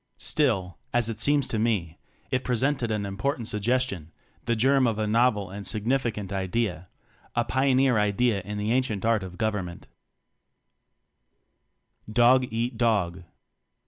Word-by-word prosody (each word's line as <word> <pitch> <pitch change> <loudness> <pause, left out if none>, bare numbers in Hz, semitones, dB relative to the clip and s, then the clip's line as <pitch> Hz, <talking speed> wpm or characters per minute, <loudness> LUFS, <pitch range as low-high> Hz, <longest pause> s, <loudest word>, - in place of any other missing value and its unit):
Still, 100 - 0 0.2
as 120 -2 +2
it 110 - -5
seems 145 -2 +3
to 110 - -2
me, 100 -8 -1 0.3
it 130 0 0
presented 125 0 0
an 105 -2 -1
important 115 +5 -2
suggestion, 105 -6 -1 0.3
the 115 - +1
germ 130 +3 +3
of 110 -2 -1
a 110 - 0
novel 105 -3 +2
and 100 -1 -7
significant 110 -2 -1
idea 95 -2 -2 0.5
a 120 0 +1
pioneer 130 -2 +2
idea 105 +1 +1
in 105 +3 -6
the 105 +2 -1
ancient 120 -5 0
art 115 -2 +2
of 90 -1 -8
government. 105 -6 -3 2.3
Dog 125 +2 +4
Eat 115 +1 -3
Dog. 95 -7 +1
110 Hz, 135 wpm, -26 LUFS, 100-125 Hz, 2.3 s, Dog